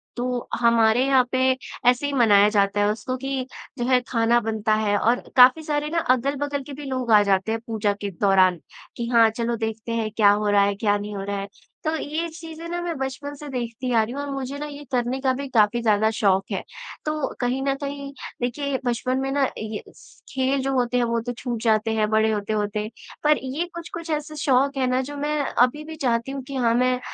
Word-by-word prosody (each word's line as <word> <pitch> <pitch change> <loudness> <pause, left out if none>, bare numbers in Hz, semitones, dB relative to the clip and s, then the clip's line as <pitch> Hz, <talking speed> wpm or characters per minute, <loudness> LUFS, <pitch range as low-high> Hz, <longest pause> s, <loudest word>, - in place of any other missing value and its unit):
तो 245 0 -3
हमारे 235 +1 +4
यहाँ 265 -2 +4
पे 260 - +1 0.5
ऐसे 250 +3 +1
ही 285 - -2
मनाया 210 -5 +5
जाता 205 -1 +1
है 205 - +3
उसको 255 +4 -4
कि 270 -1 -3 0.3
जो 240 - -1
है 255 -1 +4
खाना 235 0 +3
बनता 220 -1 -1
है 210 -1 +1
और 235 +4 +2 0.2
काफ़ी 255 +5 +7
सारे 295 0 -1
ना 335 - -2 0.2
अगल-बगल 280 +2 -2
के 280 - -9
भी 290 +1 -8
लोग 255 -3 -2
आ 210 -1 +8
जाते 195 +2 +1
हैं 225 0 -2
पूजा 210 -2 0
के 200 - -2
दौरान 185 -3 +4 0.4
कि 235 -1 -3
हाँ, 230 -2 +5
चलो 235 +1 -2
देखते 220 +1 -4
हैं 225 -2 -1
क्या 205 -2 +5
हो 210 0 +1
रहा 200 -1 +5
है, 200 0 +1
क्या 205 0 +1
नहीं 205 0 -6
हो 195 - -4
रहा 200 0 -3
है। 195 - -5 0.4
तो 315 0 0
ये 315 +3 -3
चीज़ 325 0 -10
है 335 - -6
ना 350 - -2
मैं 345 -2 -3
बचपन 270 +2 -4
से 295 +1 -10
देखती 250 0 -4
आ 225 - +4
रही 235 +3 -5
हूँ 285 - -4
और 285 - -5
मुझे 275 +1 -4
ना 300 - -4
ये 290 0 -8
करने 250 +1 0
का 260 -2 +2
भी 280 - -4
काफ़ी 225 0 +3
ज़्यादा 220 -1 +3
शौक 195 -3 +2
है। - - -2 0.4
तो 305 -2 -1
कहीं 250 +2 0
न 275 0 +1
कहीं 280 0 -5 0.3
देखिए 250 +4 -2
ये 275 -2 -1
बचपन 255 +2 0
में 270 0 -2
ना 280 0 +1
ये 215 -1 -5
स - - -19
खेल 265 +1 +1
जो 270 0 -1
होते 250 -1 +1
हैं 245 - +2
वो 235 0 0
तो 245 +1 -4
छूट 235 -2 -4
जाते 220 0 +2
हैं, 215 -1 +1
बड़े 220 0 +3
होते-होते। 210 0 -2 0.4
पर 300 0 +4
ये 280 +7 -2
कुछ-कुछ 335 0 -7
ऐसे 305 0 -3
शौक 275 -1 +2
हैं 260 -1 +1
ना 255 +1 +1
जो 290 - -6
मैं 300 +1 -1
अभी 255 +5 +1
भी 320 0 -8
चाहती 245 -3 -1
हूँ 275 0 -4
कि 275 +1 -8
हाँ 235 -3 +2
मैं 250 +1 +2
245 Hz, 230 wpm, -23 LUFS, 220-275 Hz, 0.5 s, आ